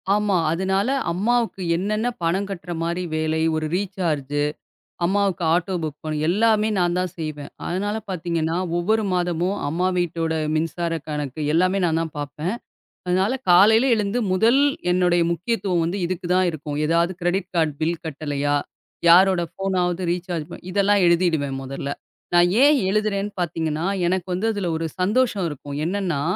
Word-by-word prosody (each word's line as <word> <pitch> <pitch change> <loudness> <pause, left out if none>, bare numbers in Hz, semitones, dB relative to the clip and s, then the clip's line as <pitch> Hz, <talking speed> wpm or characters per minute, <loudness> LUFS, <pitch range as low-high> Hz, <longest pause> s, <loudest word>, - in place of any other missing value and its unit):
ஆமா. 205 -2 +1
அதனால 190 +4 0 0.2
அம்மாவுக்கு 225 +3 0
என்னென்ன 215 +6 -1 0.2
பணம் 185 +4 0
கட்டுற 175 -2 -6
மாரி 170 +2 -2
வேலை, 155 0 0
ஒரு 155 - -1
ரீசார்ஜூ 160 -7 -1 0.6
அம்மாவுக்கு 195 -1 +1
ஆட்டோ 180 +2 0
புக் 150 -2 -4
பண் 155 -1 -2
எல்லாமே 215 +3 +3
நான் 175 0 +1
தான் 180 -1 -1
செய்வேன். 155 -3 -5 0.2
அதனால 205 +4 -2
பாத்தீங்கன்னா, 165 -2 -1 0.2
ஒவ்வொரு 215 +5 +1
மாதமும் 180 +1 0
அம்மா 180 +5 0
வீட்டோட 165 -2 -1 0.2
மின்சார 165 +2 -1
கணக்கு 150 -1 -4
எல்லாமே 185 +4 +2
நா 170 - +2
தான் 165 -2 -3
பாப்பேன். 150 - -3 0.5
அதனால 185 +5 +2 0.2
காலையில 220 +8 +6
எழுந்து 210 +1 -1
முதல் 230 +8 +4 0.3
என்னுடைய 175 -1 +3
முக்கியத்துவம் 175 -2 -1
இதுக்கு 180 0 -4
தான் 185 0 +3
இருக்கும். 150 -2 -6
ஏதாவது 170 +3 +2
கிரெடிட் 180 +2 -1
கார்ட் 160 -3 +2
பில் 165 +1 -1
கட்டலையா? 145 -2 -1 0.5
யாரோட 185 +1 +6
ஃபோனாவது 185 -2 -1
ரீசார்ஜ் 175 -3 -4
பண - - -8
இதெல்லாம் 200 +1 +3
எழுதிடுவேன். 165 -6 +2
முதல்ல 135 +1 -5 0.4
நான் 175 0 +5
ஏன் 290 +1 +6
எழுதுறேன்னு 210 0 0
பாத்தீங்கன்னா, 160 -2 -2 0.2
எனக்கு 180 0 0
வந்து 185 +5 -1
அதுல 200 -4 -2
ஒரு 165 +1 -2
சந்தோஷம் 210 -1 +1
இருக்கும். 145 -1 -7
என்னன்னா 180 -6 -1
175 Hz, 140 wpm, -22 LUFS, 160-195 Hz, 0.6 s, காலையில